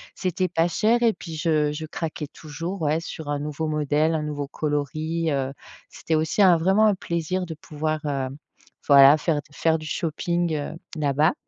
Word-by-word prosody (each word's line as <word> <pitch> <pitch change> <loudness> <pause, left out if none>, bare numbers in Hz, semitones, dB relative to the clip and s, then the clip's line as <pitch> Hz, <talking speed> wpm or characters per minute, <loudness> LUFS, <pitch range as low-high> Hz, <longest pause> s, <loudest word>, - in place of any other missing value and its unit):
C'était 185 0 -1
pas 165 +1 +2
cher 225 +7 +2
et 230 -2 +4
puis 165 -5 -8
je 155 -2 +1
je 155 +2 -5
craquais 155 -1 -5
toujours, 165 +5 -6
ouais 155 +1 +1
sur 160 -2 -7
un 145 -1 -1
nouveau 150 +2 -3
modèle, 150 +1 +1
un 155 - -1
nouveau 145 -2 -4
coloris, 155 +3 -2
heu, 135 -1 -1 0.3
c'était 160 - -3
aussi 155 +6 +1
un 180 -3 +7
vraiment 190 +6 +4
un 210 - +3
plaisir 175 +1 -2
de 165 - -6
pouvoir, 155 -2 -3
heu, 135 -3 -1 0.6
voilà 140 0 +8
faire 160 0 0
d 145 - -1
faire 160 +2 +1
du 155 - -9
shopping, 170 +2 -1
heu, 145 -1 -4 0.2
là-bas 150 +3 +2
155 Hz, 185 wpm, -24 LUFS, 150-170 Hz, 0.6 s, voilà